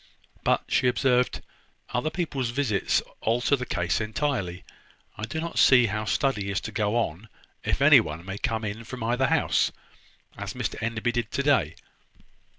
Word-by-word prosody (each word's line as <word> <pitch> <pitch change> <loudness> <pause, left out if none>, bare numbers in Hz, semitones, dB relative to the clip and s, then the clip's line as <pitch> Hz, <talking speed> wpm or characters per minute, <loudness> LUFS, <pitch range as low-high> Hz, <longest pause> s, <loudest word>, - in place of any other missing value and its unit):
"But," - - +2
she - - +2
observed, 125 0 +1 0.5
"other 125 +5 0
people's 145 -8 -2
visits 120 -5 +1 0.2
alter 120 +5 +2
the 125 -2 -5
case 85 +5 0
entirely. 105 - -2 0.5
I 110 - -4
do 115 +8 -4
not 170 +1 -3
see 125 -2 +7
how 110 0 -2
study 105 -5 0
is 100 - 0
to - - -6
go 105 -1 0
on 110 -2 -2 0.3
if - - 0
any - - +9
one 80 +3 -5
may 95 +1 -5
come 110 -1 -1
in 105 +2 -5
from 125 0 -7
either 125 +3 +1
house, - - +2 0.6
as - - -6
Mr - - -3
Enderby 115 +1 -1
did 120 -3 -2
to 140 - -2
day. 105 - +2
115 Hz, 165 wpm, -26 LUFS, 105-130 Hz, 0.6 s, any